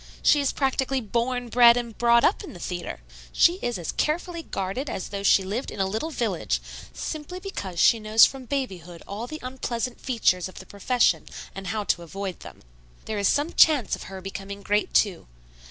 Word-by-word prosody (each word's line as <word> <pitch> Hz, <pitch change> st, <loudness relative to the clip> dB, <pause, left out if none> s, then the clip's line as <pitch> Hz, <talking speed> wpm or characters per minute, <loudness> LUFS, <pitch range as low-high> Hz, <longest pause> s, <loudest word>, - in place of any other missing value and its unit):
She 295 Hz, -, +5 dB
is 280 Hz, -, +1 dB
practically 270 Hz, -1 st, 0 dB
born, 240 Hz, +2 st, -2 dB
bred 240 Hz, 0 st, +7 dB
and 235 Hz, -2 st, -4 dB
brought 235 Hz, 0 st, +4 dB
up -, -, +2 dB
in -, -, -9 dB
the 175 Hz, -, -11 dB
theatre. 175 Hz, -, -5 dB, 0.3 s
She 350 Hz, +2 st, +4 dB
is 240 Hz, -3 st, -2 dB
as 170 Hz, -3 st, -4 dB
carefully 335 Hz, +2 st, -1 dB
guarded 225 Hz, +2 st, -4 dB
as 185 Hz, -, -4 dB
though 200 Hz, -1 st, -4 dB
she 200 Hz, -1 st, +4 dB
lived 210 Hz, +8 st, -3 dB
in -, -, -8 dB
a 195 Hz, -, +2 dB
little 220 Hz, +11 st, -2 dB
village, 225 Hz, -, -1 dB, 0.3 s
simply 315 Hz, +4 st, -6 dB
because 200 Hz, -, -6 dB
she 230 Hz, -, +5 dB
knows 215 Hz, +1 st, +6 dB
from 270 Hz, -1 st, -5 dB
babyhood 185 Hz, -, -4 dB
all 210 Hz, +4 st, -5 dB
the 310 Hz, -, -6 dB
unpleasant 250 Hz, -1 st, -4 dB
features 190 Hz, -8 st, +1 dB
of -, -, -15 dB
the 190 Hz, -, -10 dB
profession 235 Hz, +6 st, +1 dB, 0.3 s
and 195 Hz, 0 st, -7 dB
how 215 Hz, +1 st, -2 dB
to 175 Hz, -, 0 dB
avoid 190 Hz, +2 st, -6 dB
them. -, -, -12 dB, 0.4 s
There 215 Hz, -1 st, -3 dB
is 200 Hz, -, +2 dB
some 295 Hz, +4 st, +1 dB
chance 295 Hz, -7 st, +5 dB
of -, -, -10 dB
her 190 Hz, -1 st, -8 dB
becoming 195 Hz, +1 st, -7 dB
great, 210 Hz, +1 st, 0 dB
too. 195 Hz, -, +2 dB
230 Hz, 195 wpm, -25 LUFS, 195-265 Hz, 0.4 s, bred